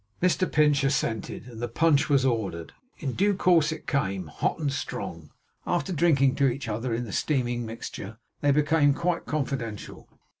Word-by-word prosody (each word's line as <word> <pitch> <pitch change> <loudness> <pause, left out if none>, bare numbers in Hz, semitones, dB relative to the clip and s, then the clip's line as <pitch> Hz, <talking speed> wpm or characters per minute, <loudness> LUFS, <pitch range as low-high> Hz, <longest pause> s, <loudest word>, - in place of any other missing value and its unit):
Mr 180 +1 +1
Pinch 150 -2 +3
assented, 115 -6 -1
and 120 -2 -10
the 120 - -1
punch 145 +5 +2
was 140 -2 +3
ordered. 100 -10 -2 0.2
In 135 -6 -3
due 200 +1 +2
course 170 -5 +3
it 160 - -7
came; 95 -9 -1
hot 75 - -2
and 145 -4 -1
strong. 90 - -5 0.4
After 175 +2 0
drinking 140 -5 +3
to 140 - +4
each 130 +1 -2
other 115 +3 -2
in 115 +2 -1
the 105 - -8
steaming 120 -5 0
mixture, 110 -1 -7 0.2
they 145 - +1
became 145 0 +3
quite 170 +1 -1
confidential. 130 -8 -4
135 Hz, 165 wpm, -26 LUFS, 115-150 Hz, 0.4 s, to